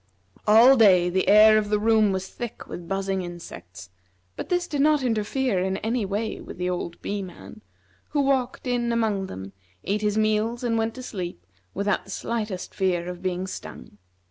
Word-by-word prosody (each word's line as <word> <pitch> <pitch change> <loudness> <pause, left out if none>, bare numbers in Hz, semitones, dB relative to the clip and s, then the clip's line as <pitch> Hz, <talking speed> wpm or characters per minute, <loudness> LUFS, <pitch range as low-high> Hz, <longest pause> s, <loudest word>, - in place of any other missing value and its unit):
All 235 +5 +7
day 180 -5 +5
the 190 +1 0
air 215 +1 +7
of 210 -1 -3
the 210 - +2
room 215 -1 +3
was 190 0 -3
thick 240 -2 -7
with 175 -1 -8
buzzing 195 0 -1
insects, 90 - -10 0.4
but - - -6
this 355 -1 0
did 290 -4 -1
not 300 -1 +3
interfere 225 -1 0
in 190 +1 -1
any 225 0 -1
way 210 +3 -3
with - - -10
the 180 0 -1
old 170 -1 -4
Bee 205 0 -2
man, 175 - -11 0.5
who 290 - +1
walked 270 -3 0
in 240 -1 0
among 215 -4 0
them, 95 - -8 0.3
ate 210 +2 -1
his 210 0 0
meals, 215 +2 +1
and 235 -2 0
went 225 0 -1
to 255 - -8
sleep, 175 - -6 0.3
without 200 +1 0
the - - -16
slightest 210 -2 -4
fear 180 -2 0
of 180 0 -7
being 185 0 -2
stung. 105 - -9
205 Hz, 185 wpm, -25 LUFS, 185-230 Hz, 0.5 s, All